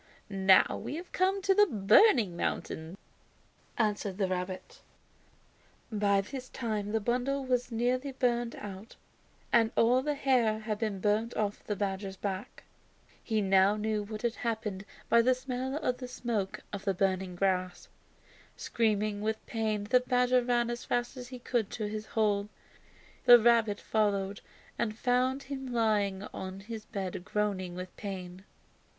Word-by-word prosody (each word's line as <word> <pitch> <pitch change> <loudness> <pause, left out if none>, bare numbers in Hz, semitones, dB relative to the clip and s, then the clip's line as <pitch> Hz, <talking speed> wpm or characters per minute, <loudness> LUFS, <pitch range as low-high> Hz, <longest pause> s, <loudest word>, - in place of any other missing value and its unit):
"Now 190 -1 +4
we - - -4
have 345 +3 -8
come 380 +1 +1
to 390 0 +4
the 415 +1 +5
'Burning 215 - +5
Mountain,'" 165 +1 -3 0.8
answered 210 -3 0
the 195 -2 +1
rabbit. 185 0 -5 1.1
By 200 -2 +2
this 255 +5 -8
time 215 -4 -3
the 225 - +1
bundle 250 +5 -1
was 250 -1 0
nearly 250 +4 0
burned 240 -2 0
out 200 +2 -9 0.6
and 230 -2 +5
all 245 +3 +4
the 295 +2 -1
hair 250 -6 +2
had 215 -1 -4
been 210 -4 -2
burned 215 +3 +1
off 205 -1 -2
the 210 - -3
badger's 195 0 -3
back. 195 0 -5 0.6
He 220 -2 0
now 195 +1 +4
knew 215 0 -1
what 215 +1 -7
had 235 -1 -1
happened 215 -4 -3 0.2
by 235 +1 +5
the 255 +2 +3
smell 255 +1 -4
of 250 -5 -1
the 250 - -6
smoke 235 -6 -3
of 200 -1 -5
the 195 -2 0
burning 190 -1 0
grass. 185 -1 -1 0.7
Screaming 215 -2 0
with 220 +1 -2
pain 220 -2 -1
the 245 +5 +4
badger 250 0 +2
ran 240 -1 +1
as 240 0 -5
fast 240 +2 -1
as 250 -1 -8
he 255 0 -8
could 240 -3 -1
to 215 -2 -3
his 215 +1 -5
hole. 210 -2 +1 0.8
The 245 -1 +10
rabbit 225 -3 +3
followed 200 -2 0 0.4
and 215 -2 -1
found 255 +3 +1
him 265 -2 -6
lying 210 -4 +1
on 190 +1 -6
his 215 +1 -7
bed 190 -5 -5
groaning 195 -3 -2
with 180 0 -7
pain. 185 -2 -7
215 Hz, 155 wpm, -30 LUFS, 200-245 Hz, 1.1 s, The